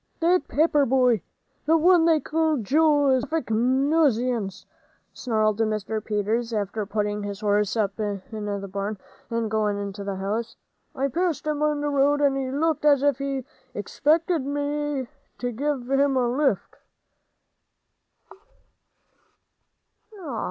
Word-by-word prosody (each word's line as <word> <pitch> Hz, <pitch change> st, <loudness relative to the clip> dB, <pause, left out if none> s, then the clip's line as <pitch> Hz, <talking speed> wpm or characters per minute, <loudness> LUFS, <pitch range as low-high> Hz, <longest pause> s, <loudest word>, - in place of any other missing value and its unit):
"That 355 Hz, +2 st, +2 dB
Pepper 300 Hz, -1 st, +3 dB
boy 250 Hz, -4 st, +3 dB, 0.5 s
th' 325 Hz, +1 st, +5 dB
one 345 Hz, 0 st, +5 dB
they 325 Hz, -2 st, +4 dB
call 315 Hz, 0 st, 0 dB
Joel 290 Hz, +4 st, +3 dB
is 260 Hz, -1 st, +2 dB
a -, -, -5 dB
perfect 315 Hz, -7 st, -2 dB
nuisance," 250 Hz, -, +1 dB, 0.5 s
snarled 215 Hz, -3 st, 0 dB
Mr. 215 Hz, -1 st, -1 dB
Peters, 220 Hz, +3 st, -1 dB
after 210 Hz, 0 st, -2 dB
putting 210 Hz, 0 st, -2 dB
his 205 Hz, 0 st, -6 dB
horse 210 Hz, +1 st, +1 dB
up 200 Hz, -1 st, -1 dB
in 205 Hz, -2 st, -2 dB
the 205 Hz, -2 st, -4 dB
barn, 200 Hz, +2 st, -4 dB, 0.3 s
and 230 Hz, -2 st, -2 dB
going 210 Hz, -2 st, 0 dB
into 200 Hz, 0 st, -5 dB
the 200 Hz, -1 st, -3 dB
house. 215 Hz, +5 st, -3 dB, 0.4 s
"I 270 Hz, +1 st, 0 dB
passed 335 Hz, +3 st, -1 dB
him 300 Hz, -1 st, -1 dB
on 300 Hz, -1 st, +1 dB
the 295 Hz, -, -1 dB
road, 285 Hz, +1 st, +2 dB
and 285 Hz, -2 st, +3 dB
he 265 Hz, -1 st, -2 dB
looked 310 Hz, +4 st, 0 dB
as 285 Hz, -2 st, +4 dB
if 285 Hz, -2 st, +2 dB
he 275 Hz, -2 st, -3 dB, 0.3 s
'xpected 310 Hz, -, +1 dB
me 290 Hz, -1 st, -2 dB, 0.3 s
to 245 Hz, 0 st, -3 dB
give 270 Hz, +1 st, -2 dB
him 275 Hz, 0 st, +2 dB
a 250 Hz, -1 st, +2 dB
lift." 255 Hz, -4 st, 0 dB
255 Hz, 140 wpm, -24 LUFS, 215-290 Hz, 0.5 s, th